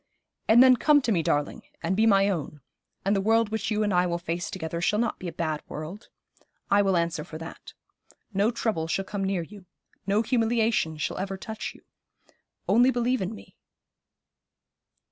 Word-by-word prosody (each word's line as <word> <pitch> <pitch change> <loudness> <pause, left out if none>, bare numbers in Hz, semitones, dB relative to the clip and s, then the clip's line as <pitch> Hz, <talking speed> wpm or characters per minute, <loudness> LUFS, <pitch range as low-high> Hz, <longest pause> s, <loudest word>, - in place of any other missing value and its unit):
And 235 +3 +7
then 255 -1 +6
come 295 +4 +5
to 235 - 0
me, 175 -5 +2
darling, 145 -2 -1 0.2
and 175 +3 0
be 220 +3 +3
my 195 -2 +5
own, 155 -6 -3 0.4
and 200 +1 +2
the 195 - +1
world 225 +1 +3
which 220 -1 -2
you 215 -1 +1
and 205 -2 0
I 180 0 +3
will 170 0 -1
face 175 0 -4
together 170 -2 -4
shall 210 - +1
not 235 0 -1
be 185 - -6
a - - -4
bad 155 -3 -2
world. 160 +8 -8 0.6
I 200 +1 +5
will 195 -2 +2
answer 170 -1 -1
for 155 - -9
that. 165 +1 -10 0.6
No 200 +3 +2
trouble 220 -9 -1
shall 195 +4 -1
come 200 0 -4
near 190 -3 -1
you. 195 +1 -13 0.4
No 205 +3 +2
humiliation 225 - +1
shall - - -3
ever 195 0 -3
touch 220 +3 -6
you. - - -18 0.8
Only 245 +2 +5
believe 245 -1 0
in 190 +4 -3
me.' - - -15
195 Hz, 185 wpm, -26 LUFS, 170-220 Hz, 0.8 s, And